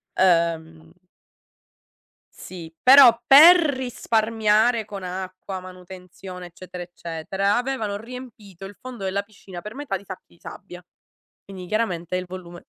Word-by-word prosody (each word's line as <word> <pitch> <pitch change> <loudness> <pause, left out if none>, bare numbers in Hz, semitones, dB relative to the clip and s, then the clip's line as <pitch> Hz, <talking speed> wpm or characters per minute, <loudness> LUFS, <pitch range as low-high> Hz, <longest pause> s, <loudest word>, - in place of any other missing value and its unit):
ehm 165 - 0 1.4
Sì, 170 -3 -10
però 255 -3 +8
per 315 +7 +9
risparmiare 230 -6 +1
con 200 -2 -9
acqua, 185 +1 -6
manutenzione, 185 0 -11
eccetera, 180 +1 -10
eccetera. 180 +4 -3
Avevano 240 -5 -2
riempito 220 -5 -11
il 195 +1 -10
fondo 250 -6 -8
della 195 +1 -1
piscina 200 -3 -12
per 210 +4 -9
metà 275 -9 -4
di 200 - -11
sacchi 190 -3 -11
i - - -25
sabbia, 180 0 -11 0.6
quindi 190 -2 -9
chiaramente 180 -4 -2
il 185 - -3
volume 175 -1 -10
195 Hz, 120 wpm, -23 LUFS, 180-225 Hz, 1.4 s, per